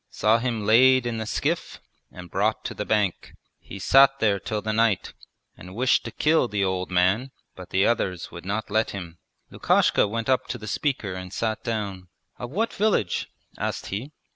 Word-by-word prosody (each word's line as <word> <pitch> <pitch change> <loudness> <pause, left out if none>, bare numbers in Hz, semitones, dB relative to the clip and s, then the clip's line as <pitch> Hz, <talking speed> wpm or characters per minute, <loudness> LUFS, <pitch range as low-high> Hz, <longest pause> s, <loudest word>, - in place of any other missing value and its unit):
Saw 110 +3 +2
him 115 -3 -2
laid 130 +3 +5
in 115 -2 -2
the 110 - -4
skiff - - -2 0.3
and 90 -1 -11
brought 105 +3 0
to - - -3
the 105 - -5
bank. 105 -4 -1 0.2
He 100 - -10
sat 135 +7 +5
there 105 -5 +1
till 105 +4 -3
the 110 +1 -3
night 110 -3 +1 0.4
and 90 +2 -12
wished 125 +2 +2
to - - -5
kill 155 -4 +2
the 105 -3 -1
old 95 -1 -2
man, 95 +8 +2 0.3
but 90 -1 -11
the 95 +1 +2
others 95 -7 -1
would 85 - -9
not 105 +3 -3
let 110 +1 +1
him.' 85 -3 -9 0.3
Lukashka - - +2
went 115 +2 -3
up 130 -1 +1
to 125 - -4
the 110 - -10
speaker, 110 -3 -2
and 90 -1 -7
sat 110 +1 -2
down. 100 -6 -4 0.3
'Of 120 - -5
what 215 - -1
village?' 195 - 0 0.3
asked - - -3
he. 120 +9 -4
110 Hz, 190 wpm, -25 LUFS, 95-120 Hz, 0.4 s, laid